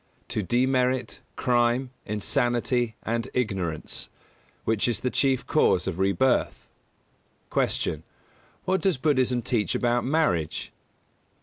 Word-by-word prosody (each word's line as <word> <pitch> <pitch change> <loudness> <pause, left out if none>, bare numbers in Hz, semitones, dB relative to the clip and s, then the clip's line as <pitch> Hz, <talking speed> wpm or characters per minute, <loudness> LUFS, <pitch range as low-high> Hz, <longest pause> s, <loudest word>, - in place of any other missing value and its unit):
To 110 - -1
demerit, 125 +4 +1 0.2
crime, 120 +1 +1 0.2
insanity, 120 +3 0
and 115 +1 -2
ignorance 95 -10 -2 0.6
which 110 0 +1
is 120 - -1
the 125 - -1
chief 135 -2 +1
cause - - +3
of 85 - -3
rebirth. 100 +7 +1 0.9
205. - - +2
Q. 80 0 -2 0.6
_What 190 +1 +2
does 190 -7 +2
Buddhism 130 -4 +1
teach 110 -4 0
about 120 0 +1
marriage? 125 - 0
120 Hz, 110 wpm, -26 LUFS, 105-130 Hz, 0.9 s, cause